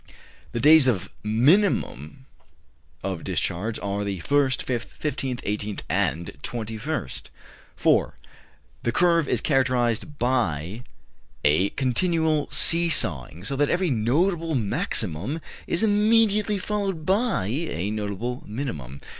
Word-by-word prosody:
3. -, -, -21 dB, 0.4 s
The 120 Hz, -, -1 dB
days 150 Hz, +1 st, +7 dB
of 105 Hz, -8 st, 0 dB
minimum 125 Hz, -, +1 dB, 0.8 s
of 95 Hz, -4 st, -3 dB
discharge 105 Hz, +6 st, -2 dB
are 100 Hz, 0 st, -2 dB
the 100 Hz, -1 st, -3 dB
1st, 135 Hz, +7 st, +1 dB
5th, 120 Hz, -3 st, -4 dB
15th, 135 Hz, -4 st, -3 dB
18th, 105 Hz, 0 st, -3 dB
and 85 Hz, -4 st, 0 dB
21st. 115 Hz, -, -4 dB, 0.5 s
4. -, -, +2 dB, 0.6 s
The 120 Hz, -, 0 dB
curve 170 Hz, 0 st, +3 dB
is 120 Hz, -, +1 dB
characterized 130 Hz, -1 st, 0 dB
by 110 Hz, -, -1 dB, 0.6 s
a 80 Hz, +7 st, +3 dB
continual 155 Hz, +3 st, +1 dB
see 170 Hz, 0 st, +4 dB
sawing; 80 Hz, -, +1 dB
so 125 Hz, +7 st, -1 dB
that 145 Hz, +1 st, +1 dB
every 180 Hz, -2 st, +1 dB
notable 160 Hz, -, +1 dB
maximum 105 Hz, -, -2 dB, 0.3 s
is 170 Hz, -, +1 dB
immediately 210 Hz, 0 st, +3 dB
followed 195 Hz, -5 st, -3 dB
by 200 Hz, -, +1 dB
a 105 Hz, -, -2 dB
notable 110 Hz, +4 st, -4 dB
minimum. 80 Hz, -, -5 dB
125 Hz, 115 wpm, -24 LUFS, 100-160 Hz, 0.8 s, days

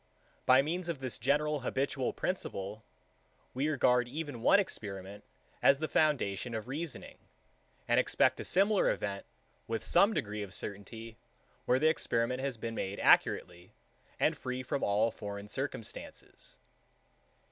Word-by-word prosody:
By 130 Hz, +1 st, +7 dB
means 170 Hz, +3 st, -2 dB
of 165 Hz, -, -2 dB
this 130 Hz, -2 st, -5 dB
general 150 Hz, +4 st, +1 dB
habitual 130 Hz, 0 st, -1 dB
principle, 110 Hz, -, -4 dB, 0.7 s
we 140 Hz, +4 st, 0 dB
regard 125 Hz, -4 st, +3 dB
even 145 Hz, -2 st, -5 dB
one 200 Hz, -, +6 dB
experiment 100 Hz, -, -5 dB, 0.4 s
as 140 Hz, -, +6 dB
the 155 Hz, +2 st, -2 dB
foundation 125 Hz, -8 st, +1 dB
of 110 Hz, +1 st, -5 dB
reasoning, 150 Hz, +3 st, -5 dB, 0.7 s
and -, -, +4 dB
expect -, -, +2 dB
a -, -, -3 dB
similar 200 Hz, +2 st, +3 dB
event 100 Hz, -1 st, -3 dB, 0.4 s
with 115 Hz, -1 st, -3 dB
some 195 Hz, -, +4 dB
degree 105 Hz, 0 st, -2 dB
of 100 Hz, -2 st, -6 dB
certainty, 110 Hz, +3 st, -6 dB, 0.5 s
where 125 Hz, -, +3 dB
the 150 Hz, -, 0 dB
experiment 125 Hz, -5 st, +1 dB
has 135 Hz, -3 st, -2 dB
been 115 Hz, +1 st, -4 dB
made 100 Hz, -2 st, -4 dB
accurately, 90 Hz, 0 st, +2 dB, 0.5 s
and -, -, +3 dB
free 130 Hz, 0 st, -4 dB
from 135 Hz, +2 st, -2 dB
all 105 Hz, +3 st, +2 dB
foreign 100 Hz, -1 st, -7 dB
circumstances. 130 Hz, -1 st, -6 dB
125 Hz, 135 wpm, -32 LUFS, 105-145 Hz, 0.7 s, By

